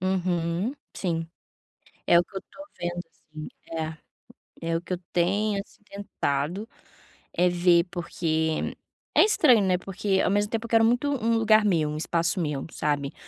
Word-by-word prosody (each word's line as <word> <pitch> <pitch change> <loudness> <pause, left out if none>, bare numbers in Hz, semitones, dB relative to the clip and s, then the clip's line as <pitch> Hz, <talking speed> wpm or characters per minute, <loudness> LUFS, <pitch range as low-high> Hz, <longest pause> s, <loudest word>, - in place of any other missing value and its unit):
Uhum, 180 +2 0 0.2
sim. 165 -3 -2 0.8
É 170 - +7
o - - +2
que 195 - -21
eu - - -1
estou 290 +1 -13
vendo, 175 0 -2
assim. 155 -1 -11 1.1
É, 165 - -3
é 165 - +2
o 165 - -5
que 185 - -5
eu 180 - -3
tenho, 200 +4 +1
assim, 200 - -20
tentado, 195 -2 -3 0.7
eh, 180 +1 +3
ver. 175 0 +4
Porque 160 -3 -1 0.4
é - - +8
estranho, 310 - +5
né? 185 -2 +2
Porque, 195 +1 -1
ao - - +2
mesmo 205 +1 +1
tempo, 225 0 -2
eu - - -8
quero 225 -1 +5
muito 245 +5 +2
um 230 -5 +1
lugar 220 -1 +5
meu, 165 -7 +2
um 150 - -4
espaço 170 +4 0
meu, 150 -5 -2
sabe? 145 -2 -1
180 Hz, 165 wpm, -26 LUFS, 165-210 Hz, 1.1 s, é